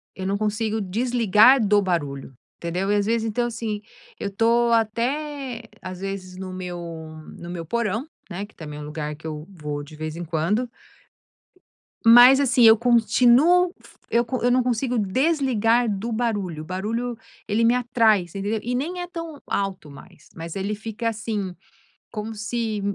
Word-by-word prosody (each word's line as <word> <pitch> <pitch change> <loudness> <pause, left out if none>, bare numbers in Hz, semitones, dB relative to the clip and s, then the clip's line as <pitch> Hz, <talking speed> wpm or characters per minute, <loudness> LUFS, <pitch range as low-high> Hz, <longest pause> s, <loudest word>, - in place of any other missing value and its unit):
eu 190 - -5
não 195 +1 0
consigo 215 +1 -1
desligar 230 +3 +4
do 205 0 +4
barulho 145 -8 -2 0.2
entendeu? 180 +4 -2
E - - +3
às 205 -1 +1
vezes 225 +1 0
então, 240 +2 0
assim, 220 -3 -4 0.4
eu - - -2
estou 230 +3 +2
até 245 +3 -1 0.2
às 185 -1 -6
vezes 190 -1 -6
no 185 0 -6
meu 180 -1 -5 0.6
no 170 - -9
meu 175 -1 -5
porão, 230 - -1 0.2
né, 190 +1 -5
que 205 - -22
também 150 -2 -8
é - - -7
lugar 150 0 -5
que 155 +2 -9
eu 155 -1 -6
vou 150 -6 -5
de 155 +2 -12
vez 155 0 -5
em 175 - -5
quando 170 +9 0 1.4
mas 245 +4 +9
assim 255 -3 +3
eu 225 -1 +9
fa 225 - -15
continuo 250 - +4 0.4
eu 235 +1 +2 0.2
eu 245 - +3
não 250 0 +3
consigo 245 +1 0
desligar 240 - +2
do 210 +3 -3
barulho, 205 -9 -2
o - - -11
barulho 225 +7 -3 0.3
ele 215 +2 +1
me 235 +2 +4
atrai 230 -4 +3
entendeu? 200 +5 -3
E 245 +2 -2
nem 340 +8 -3
é 355 - -5
tão 330 -4 -7
alto 195 -6 -2
mais 140 +1 -15
mas 165 0 -7
ele 200 +2 -2
fica, 225 +2 -4
assim, 210 -4 -4 0.6
como 215 +1 -5
se 215 0 -2
215 Hz, 165 wpm, -23 LUFS, 185-240 Hz, 1.4 s, mas